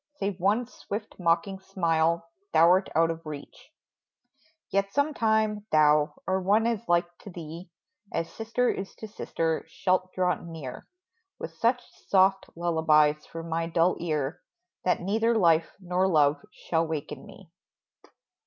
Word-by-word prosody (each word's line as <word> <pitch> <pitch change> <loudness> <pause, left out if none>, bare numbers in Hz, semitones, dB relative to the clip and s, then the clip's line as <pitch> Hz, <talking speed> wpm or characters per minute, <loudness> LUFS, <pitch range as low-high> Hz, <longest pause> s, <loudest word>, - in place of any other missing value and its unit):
Save 200 -7 -3
one 205 +7 +2
swift, 215 -3 -7
mocking 180 +3 +1
smile 170 -3 0 0.3
thou 170 +1 +6
'rt 185 +2 +3
out 165 +1 +4
of 165 0 -7
reach! 150 -2 -9 1.0
Yet, 195 0 +1
sometime, 220 -7 +1
thou, 150 -1 +4
or 190 0 0
one 205 +4 +3
as 230 -3 0
like 175 0 +2
to - - -11
thee 170 0 -9 0.4
As 165 - -2
sister 230 +3 -1
is 195 -4 -3
to 220 - -8
sister, 165 -6 -2
shalt 185 +2 0
draw 180 -1 +2
near 160 -6 -8 0.5
With - - -7
such 245 +1 +1 0.2
soft 195 0 +3
lullabies 155 -3 +2
for 165 0 -7
my 165 0 -2
dull 170 +2 +2
ear, 155 -2 -2 0.4
That 180 - +2
neither 225 +5 +1
life 165 -4 +3
nor 185 0 0
love 145 -4 +3
shall 165 -1 -1
waken 155 -3 -5
me - - -15
175 Hz, 140 wpm, -27 LUFS, 165-200 Hz, 1.0 s, thou